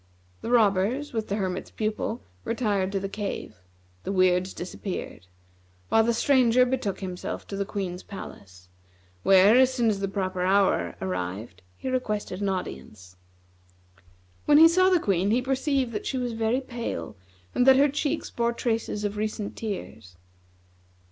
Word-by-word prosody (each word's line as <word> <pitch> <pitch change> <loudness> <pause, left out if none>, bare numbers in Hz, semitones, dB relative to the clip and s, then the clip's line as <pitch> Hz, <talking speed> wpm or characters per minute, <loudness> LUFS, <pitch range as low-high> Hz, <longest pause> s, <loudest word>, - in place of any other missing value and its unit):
The - - -5
robbers, 230 +5 +2
with 220 -2 -2
the 200 - -1
Hermit's 190 -3 -3
Pupil, 220 +2 -3 0.2
retired 205 -5 0
to 195 - -1
the 195 - -3
cave; 200 - -5 0.5
the - - -3
Weirds 185 -1 +2
disappeared; 180 - -6 0.6
while 225 - +5
the 235 - +2
Stranger 250 0 +4
betook 245 -7 -2
himself 185 -2 -5
to 200 - -4
the 200 0 -2
Queen's 190 -3 -4
palace, 90 - -11 0.5
where, 195 - +6
as 260 0 +5
soon 240 -4 +2
as 200 - -3
the 195 - -1
proper 185 -2 -3
hour 190 - +2
arrived, 90 +1 -4 0.2
he - - -7
requested 215 -7 -2
an 200 - 0
audience. 105 - -6 1.3
When 295 - +6
he 320 +2 +10
saw 370 +3 +4
the 365 -2 +4
Queen, 195 - +1
he 230 +4 +3
perceived 265 0 0
that 210 - -4
she 265 - -2
was 245 -2 -2
very 225 +3 0
pale 235 - -5 0.4
and 250 - +2
that 265 0 +8
her 285 +2 +5
cheeks 295 +2 -2
bore 235 0 0
traces 225 -3 -2
of 205 0 -2
recent 215 -1 -3
tears. 110 - -6
210 Hz, 155 wpm, -26 LUFS, 185-245 Hz, 1.3 s, he